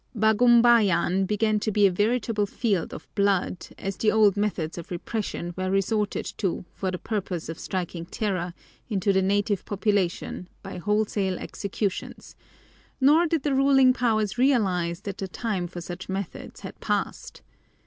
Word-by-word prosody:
Bagumbayan 220 -4 +4
began 215 +1 +1
to 215 - -1
be 205 0 +4
a 195 - +5
veritable 210 +1 +1
field 200 -5 -1
of - - -9
blood, 200 -2 0
as 195 0 -4
the 215 - +2
old 215 -3 +4
methods 190 -6 -2
of 170 - -9
repression 175 -1 -4
were 185 0 -2
resorted 200 +2 0
to 190 -3 -1
for 190 - -2
the 185 - -3
purpose 185 -6 -4
of 165 - -6
striking 175 -2 -4
terror 185 -3 -2 0.3
into 200 -2 +1
the 190 - +3
native 200 +1 +1
population 200 -3 -1
by 195 -2 -7
wholesale 205 -1 0
executions, 200 -1 -4 0.6
nor 300 +6 +5
did 320 -3 0
the 290 - +1
ruling 270 -1 +5
powers 220 -3 0
realize 190 -10 +2
that 200 -1 -6
the 195 - -3
time 190 -2 -2
for 175 0 -8
such 175 +2 -7
methods 190 -1 -5
had - - -9
passed. - - -3
200 Hz, 150 wpm, -26 LUFS, 185-220 Hz, 0.6 s, a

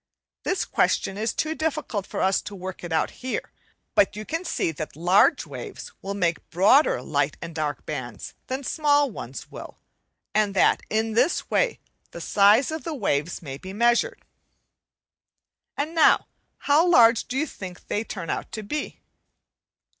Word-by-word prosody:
This 370 +1 -1
question 195 - +1
is 220 +3 -1
too 315 0 -1
difficult 290 -10 -2
for - - -4
us 190 0 +2
to 205 - -8
work 185 -1 -7
it 175 - -6
out 160 - +1
here, 255 0 -3 0.4
but 200 - +3
you 215 +1 -6
can 330 +7 -3
see 250 - -1
that 155 0 -7
large 185 - +4
waves - - -8
will 200 +1 -4
make 175 -4 -1
broader 210 - +4
light 145 -1 0
and 165 - -7
dark 150 -3 -3
bands 120 -4 -6
than 260 +2 -3
small 290 -1 +2
ones 130 - -8
will, - - -9 0.6
and 210 -2 +1
that - - +4
in 220 +1 0
this 250 +9 +1
way - - +1 0.3
the - - -9
size 210 +8 +4
of 315 0 -4
the 325 -2 -4
waves 165 - -1
may 135 -2 -7
be 190 +3 -8
measured. 240 - +1 1.5
And 300 +3 -2
now 325 - +5 0.3
how 300 +5 +3
large 235 -9 +6
do 255 - -3
you 305 - +1
think 185 - -9
they 210 - -1
turn 180 -7 -5
out - - -4
to 215 - -5
be? 295 +9 -5
215 Hz, 165 wpm, -25 LUFS, 180-285 Hz, 1.5 s, large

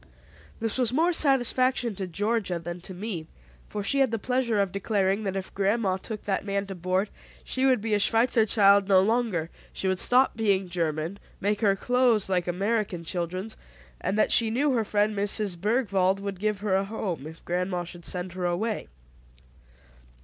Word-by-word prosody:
This 225 +2 -2
was 240 -3 +2
more 330 +7 +2
satisfaction 255 -5 +3
to 190 -1 -5
Georgia 205 0 -1
than 170 +1 -6
to 185 - -8
me, 180 -5 -5 0.4
for 205 - -4
she 275 +7 +2
had 270 -2 +4
the 225 - -1
pleasure 245 -1 0
of 195 -2 +1
declaring 200 +1 0
that 195 -1 -2
if 190 -1 -5
grandma 200 -1 +1
took 210 +2 -7
that 195 -2 -1
man 200 -1 -2
to 195 - -6
board, 185 +3 -1 0.3
she 265 +1 0
would 255 -5 +3
be 220 0 -1
a 205 - +3
Schweitzer 225 +1 +3
child 200 -2 +5
no 195 -2 +6
longer, 200 -5 0 0.2
she 190 - -3
would 185 -1 0
stop 255 +2 +4
speaking 195 -4 +1
German, 165 +2 -2 0.2
make 205 +1 0
her 200 -3 +3
clothes 245 -2 +2
like 180 -2 +1
American 195 0 -1
children's; 180 +5 -4 0.4
and 200 - -2
that - - +3
she 230 -2 +4
knew 275 +6 +1
her 235 -3 +1
friend 210 0 +1
Mrs. 205 -1 0
Bergwald 195 -1 +1
would 195 -2 -5
give 210 -1 -1
her 205 -2 0
a 195 - +2
home, 190 -8 -4
if 160 +1 -12
grandma 180 0 -1
should 175 0 -10
send 180 +1 -4
her 185 -1 -3
away. 210 +5 -2
200 Hz, 185 wpm, -26 LUFS, 185-225 Hz, 0.4 s, no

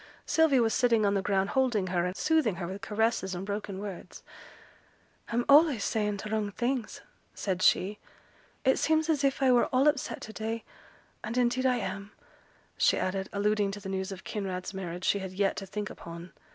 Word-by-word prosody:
Sylvia 300 -6 +4
was 225 - +1
sitting 235 -4 +3
on 200 - +2
the 195 - +1
ground 195 0 +1
holding 245 -7 +1
her, 175 0 +1
and 180 - -5
soothing 305 - +2
her 175 0 -4
with 190 +3 -6
caresses 210 -3 0
and 180 +2 -5
broken 205 -1 -4
words. 195 -2 -8 1.1
'I'm 240 +1 0
allays 285 -6 +6
saying 210 -2 0
t' 205 - -6
wrong 215 -2 0
things,' 245 +1 -2 0.3
said 185 -2 -2
she. 205 +3 +3 0.7
'It 265 - +4
seems 315 0 +2
as 295 -2 0
if 275 0 +1
I 260 - +5
were 245 -1 +4
all 265 +2 +2
upset 290 -2 0
to 220 - -8
day; 225 +1 -4 0.6
and 230 +3 -4
indeed 250 +1 +2
I 250 - +3
am;' 200 -2 -5 0.6
she - - +3
added, 190 +1 -2
alluding 205 0 +1
to 205 - -6
the 195 -1 -7
news 190 +1 -3
of 190 -1 -8
Kinraid's 190 -2 -4
marriage 180 -1 -5
she 200 - +2
had 190 -1 -6
yet 195 +1 +1
to 195 - -5
think 210 +2 -4
upon. 170 +1 -10
210 Hz, 190 wpm, -29 LUFS, 190-245 Hz, 1.1 s, allays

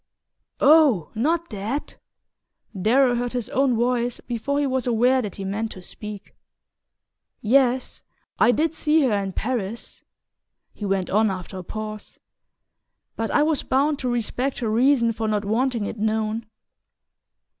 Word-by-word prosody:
"Oh, 285 - +5
not 320 +9 0
that!" 215 +8 -4 0.8
Darrow 245 +5 +4
heard 245 0 -2
his 245 -4 -3
own 265 -2 +2
voice 240 0 0
before 245 +4 -3
he 290 - +1
was 260 -2 -1
aware 245 +3 +3
that 210 -5 -6
he 195 - -6
meant 210 +3 -2
to 185 - -11
speak. 210 +1 -9 1.1
"Yes; 255 +2 +1 0.4
I - - +5
did 310 +5 +1
see 310 -1 +2
her 250 -5 +2
in 200 -1 -1
Paris," 225 -1 -4 0.7
he 210 - -6
went 195 -2 -1
on 215 +2 +3
after 185 0 -6
a - - -7
pause; 215 +2 -7 1.0
"but 225 0 -2
I - - +3
was 310 -1 +1
bound 280 +2 +1
to 255 - -2
respect 245 +3 -1
her 230 - -2
reason 235 0 +3
for 220 0 -3
not 210 -1 -1
wanting 230 +1 0
it 215 - -6
known." 220 +1 -1
235 Hz, 145 wpm, -23 LUFS, 215-265 Hz, 1.1 s, Oh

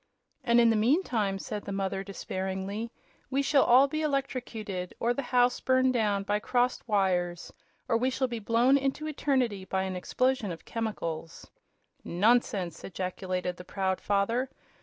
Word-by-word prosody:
"And 235 -2 +4
in 230 -1 +6
the - - +2
meantime," 220 - +1
said 205 +1 -5
the - - -5
mother, 195 0 -2
despairingly, 190 +2 -4 0.4
"we 275 +1 +1
shall 280 0 +4
all 255 +3 +6
be 310 +2 -2
electrocuted, 245 - -3
or 235 +1 +2
the 275 - -2
house 245 -1 +2
burned 260 0 +3
down 210 -4 +1
by 205 +1 0
crossed 245 +3 0
wires, 180 -5 0 0.3
or - - +2
we 250 +3 +1
shall 260 0 0
be 235 -2 -4
blown 235 +5 +3
into 275 +3 -2
eternity 260 -9 0
by 190 0 -1
an 190 -1 -3
explosion 240 +4 0
of 165 - -9
chemicals!" 170 -8 -5 0.5
"Nonsense!" 195 -2 +1
ejaculated 185 -1 -3
the 180 - -9
proud 190 0 -2
father. 225 +6 +1
220 Hz, 155 wpm, -29 LUFS, 190-255 Hz, 0.5 s, in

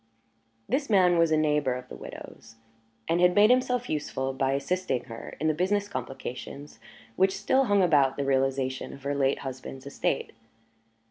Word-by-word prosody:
This 275 0 -1
man 180 -4 +4
was 165 -1 +4
a 155 - +3
neighbour 150 -4 +1
of 125 0 -8
the - - -9
widow's 115 0 -11 0.5
and 170 +2 +1
had 180 0 +4
made 210 +3 +6
himself 250 -1 +1
useful 135 -3 -2
by 135 0 0
assisting 140 -1 -1
her 115 -2 -9
in 155 - 0
the 155 - +3
business 200 +5 0
complications 140 -4 -7 0.4
which 190 +1 +3
still 265 0 +2
hung 205 -4 +3
about 145 -6 +3
the 140 - -1
realization 135 -1 0
of 140 - -16
her 140 +1 -1
late 140 -1 +1
husband's 130 0 -7
estate. 140 0 -2
150 Hz, 165 wpm, -27 LUFS, 135-185 Hz, 0.5 s, made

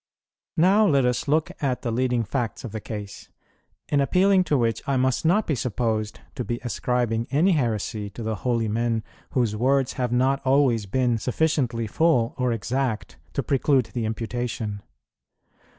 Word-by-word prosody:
Now 195 +6 +5
let 140 -6 +3
us 125 +2 0
look 155 +2 +1
at 130 -4 -1
the 120 - -1
leading 125 0 +1
facts 115 +1 -3
of 120 - -6
the 110 0 -5
case, 105 -2 -7 0.6
in 145 -1 +2
appealing 185 +6 +4
to 150 - +2
which 115 -2 0
I 140 -1 +1
must 130 +3 +1
not 195 +6 +3
be 155 - 0
supposed 110 -3 -2
to 125 - -4
be 120 +2 -3
ascribing 120 0 -1
any 160 +8 +3
heresy 110 - -1
to 120 - -4
the 110 -1 -2
holy 115 0 0
men 115 +1 0 0.3
whose 120 -5 +1
words 135 +3 +2
have 125 -2 -2
not 130 +3 +2
always 130 -6 +2
been 120 +2 +1
sufficiently 125 -3 0
full 125 -1 +2
or 125 -1 +1
exact 120 +1 -2 0.2
to - - -1
preclude 135 -2 +2
the 120 -3 -2
imputation. 110 -1 -3
125 Hz, 165 wpm, -24 LUFS, 115-135 Hz, 0.6 s, Now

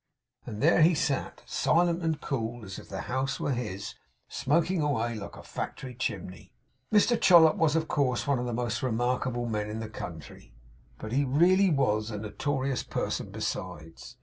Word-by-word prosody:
And 105 +3 -5
there 165 +2 +5
he 165 +2 +6
sat. 145 -3 -2
Silent 170 0 +2
and 160 -2 -1
cool, 115 -3 -3
as 95 0 -7
if - - -14
the 95 -1 -4
house 135 +2 -2
were - - -1
his; 105 -5 -4 0.3
smoking 170 +5 +1
away 120 -6 0
like 105 -3 -7
a - - -11
factory 130 -2 -6
chimney. 100 -7 -5 0.4
Mr 220 +2 +4
Chollop 165 -4 +7
was, 160 -2 +2
of 160 -1 +1
course, 130 -5 0
one 140 -3 +1
of 125 - -2
the - - -2
most 120 0 -2
remarkable 120 0 0
men 105 -2 -2
in 110 +1 -4
the 110 -1 -5
country; 80 - -9 0.4
but 110 - -7
he 140 +4 +2
really 175 +8 +4
was 110 -8 +1
a 105 - -4
notorious 130 +5 -2
person - - -3
besides. 80 -3 -6
125 Hz, 175 wpm, -28 LUFS, 110-150 Hz, 0.4 s, Chollop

